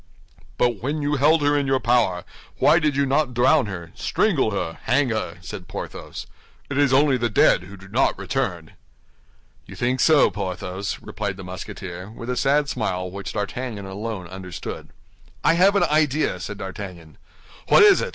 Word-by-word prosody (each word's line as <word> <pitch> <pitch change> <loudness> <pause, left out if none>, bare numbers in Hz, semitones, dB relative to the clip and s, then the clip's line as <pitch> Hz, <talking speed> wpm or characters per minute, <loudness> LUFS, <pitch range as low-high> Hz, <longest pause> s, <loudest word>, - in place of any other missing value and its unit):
"But 120 -5 +1
when 145 +4 -2
you 145 +1 0
held 150 +3 +4
her 145 0 +3
in 140 -1 +1
your 135 0 +2
power, 115 -7 +2 0.3
why 150 +5 +5
did 150 -3 0
you 140 0 +2
not 135 -2 +1
drown 130 +1 +4
her, 85 -4 -7
strangle 175 - +1
her, 85 -5 -3
hang 130 +3 +2
her?" 110 -7 -3
said 90 0 -8
Porthos. - - -7 0.5
"It 140 - 0
is 140 -3 +4
only 135 0 +4
the 120 -1 0
dead 90 -3 +4
who 100 +2 -11
do 95 +1 -14
not - - +1
return." - - -3 1.0
"You - - -10
think 125 +2 0
so, 155 -5 +5
Porthos?" 95 0 -4
replied 100 -3 -4
the 95 - -8
Musketeer, 90 0 -7
with 115 +2 -6
a - - -1
sad 140 +3 +2
smile 95 -9 -2
which 100 0 -6
D'Artagnan 105 0 -4
alone 100 0 -5
understood. 90 -2 -7 0.5
"I - - +5
have 190 +4 +4
an 200 - +4
idea," 150 -8 +1
said 100 +4 -6
D'Artagnan. 95 -5 -8 0.5
"What - - +7
is 410 -2 +7
it?" - - -2
115 Hz, 175 wpm, -23 LUFS, 95-145 Hz, 1.0 s, What